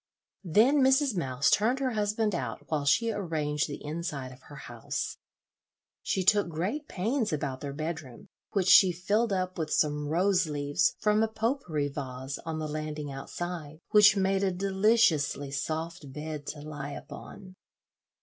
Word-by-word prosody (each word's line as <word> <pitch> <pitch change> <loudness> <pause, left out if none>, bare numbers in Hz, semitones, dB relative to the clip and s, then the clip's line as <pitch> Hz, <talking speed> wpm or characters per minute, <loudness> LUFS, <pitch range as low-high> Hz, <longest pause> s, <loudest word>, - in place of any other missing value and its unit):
Then 225 - +4
Mrs. 265 -2 +3
Mouse 135 -5 +1
turned 230 +5 +3
her 265 -2 -1
husband 210 0 0
out 125 -9 -4
while 150 -2 0
she 225 +11 +3
arranged 155 -7 -1
the 145 0 -7
inside 150 -4 -4
of 130 0 -14
her 145 - -10
house. 120 -4 -5 0.8
She 190 - -1
took 205 0 +4
great 195 - -3
pains 220 +4 -1
about 140 -3 -3
their 140 - -4
bedroom, 155 -4 -6 0.2
which 195 -3 0
she 185 0 +8
filled 205 +6 0
up 185 -1 -2
with 155 -1 -2
some 150 -1 +1
rose 180 +3 +2
leaves 145 +3 0
from 210 0 +2
a 225 - +3
"pot 225 +5 -1
pourri" 150 - -2
vase 135 -1 -6
on 160 -1 -2
the 155 -1 -3
landing 150 -1 -4
outside, 155 +2 -6
which 210 -1 +7
made 195 0 +2
a 195 - +3
deliciously 190 -7 +2
soft 155 +1 -4
bed 150 +1 -6
to 150 - -5
lie 145 -1 -6
upon. 185 +6 -10
165 Hz, 160 wpm, -29 LUFS, 145-205 Hz, 0.8 s, she